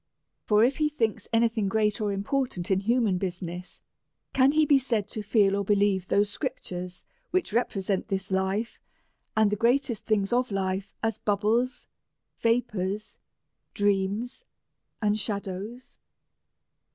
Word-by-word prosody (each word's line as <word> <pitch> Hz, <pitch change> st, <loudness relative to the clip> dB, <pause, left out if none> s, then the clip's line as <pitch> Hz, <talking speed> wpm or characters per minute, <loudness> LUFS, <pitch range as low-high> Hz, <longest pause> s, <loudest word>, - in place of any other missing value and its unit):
For 210 Hz, 0 st, +4 dB
if 260 Hz, +3 st, +2 dB
he 305 Hz, -1 st, +2 dB
thinks 230 Hz, -8 st, -1 dB
any 230 Hz, +1 st, +4 dB
thing 220 Hz, -3 st, -1 dB
great 215 Hz, +1 st, +1 dB
or 210 Hz, -1 st, 0 dB
important 200 Hz, -2 st, -1 dB
in 190 Hz, -, +4 dB
human 220 Hz, -3 st, +2 dB
business, 180 Hz, -1 st, -5 dB, 0.5 s
can 270 Hz, +2 st, +4 dB
he 310 Hz, 0 st, +4 dB
be 285 Hz, -2 st, +5 dB
said 230 Hz, -6 st, -1 dB
to 215 Hz, -, -4 dB
feel 205 Hz, -2 st, +3 dB
or 200 Hz, -, 0 dB
believe 200 Hz, -2 st, +2 dB
those 205 Hz, +1 st, +3 dB
scrip 265 Hz, +4 st, -3 dB
tures 180 Hz, 0 st, -6 dB, 0.3 s
which 370 Hz, -, 0 dB
represent 200 Hz, -5 st, 0 dB
this 195 Hz, -2 st, -3 dB
life, 190 Hz, +4 st, -1 dB, 0.6 s
and 215 Hz, -2 st, +4 dB
the -, -, +2 dB
greatest 235 Hz, +1 st, +1 dB
thing's 210 Hz, -1 st, +1 dB
of 250 Hz, +1 st, +2 dB
life, 195 Hz, 0 st, -2 dB
as 225 Hz, 0 st, 0 dB
bubbles, 225 Hz, +5 st, 0 dB, 0.5 s
vapours, 215 Hz, -3 st, -1 dB, 0.6 s
dreams, 205 Hz, -, 0 dB, 0.6 s
and 210 Hz, 0 st, +2 dB
shadows 200 Hz, +4 st, -5 dB
210 Hz, 140 wpm, -27 LUFS, 195-235 Hz, 0.6 s, be